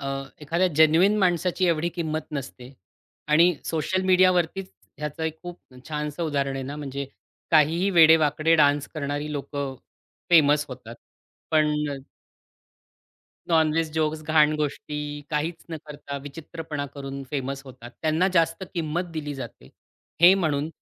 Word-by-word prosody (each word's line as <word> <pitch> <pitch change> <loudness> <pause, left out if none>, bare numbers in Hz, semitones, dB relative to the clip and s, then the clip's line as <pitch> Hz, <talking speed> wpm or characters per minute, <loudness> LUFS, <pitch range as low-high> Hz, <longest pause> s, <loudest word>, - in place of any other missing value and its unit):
अ, 135 - -5 0.4
एखाद्या 170 +5 +1
जेन्युइन 165 +7 +5
माणसाची 180 -1 +1
एवढी 170 0 +1
किंमत 160 -2 -3
नसते 130 -2 -7 0.6
आणि 170 +4 +5
सोशल 185 +4 -1
मीडियावरतीच 185 0 +3 0.3
ह्याचं 150 +1 -5
एक 160 0 -3
खूप 175 0 -8 0.3
छानसं 150 +1 -3
उदाहरण 140 -4 -1
आहे 135 - -4
ना 140 +3 -6
म्हणजे 140 -1 -5 0.4
काहीही 165 +5 +3
वेडेवाकडे 160 -2 +5
डान्स 145 -1 +3
करणारी 145 0 -3
लोकं 140 -1 -4 0.6
फेमस 150 -3 +5
होतात 120 -3 -10 0.5
पण 155 -1 +3 1.7
नॉनव्हेज 160 -1 +2
जोक्स, 155 -1 -1
घाण 155 -1 +4
गोष्टी, 150 0 -4
काहीच 160 +3 -2
न 160 - -3
करता 145 -1 -7
विचित्रपणा 150 0 -6
करून 140 -1 -6
फेमस 140 -1 -3
होतात. 125 -2 -11
त्यांना 160 +4 +2
जास्त 165 +2 +2
किंमत 170 +1 -1
दिली 145 -2 -4
जाते, 125 -4 -9 0.5
हे 180 +2 +9
म्हणून 155 -5 0
155 Hz, 125 wpm, -25 LUFS, 145-165 Hz, 1.7 s, हे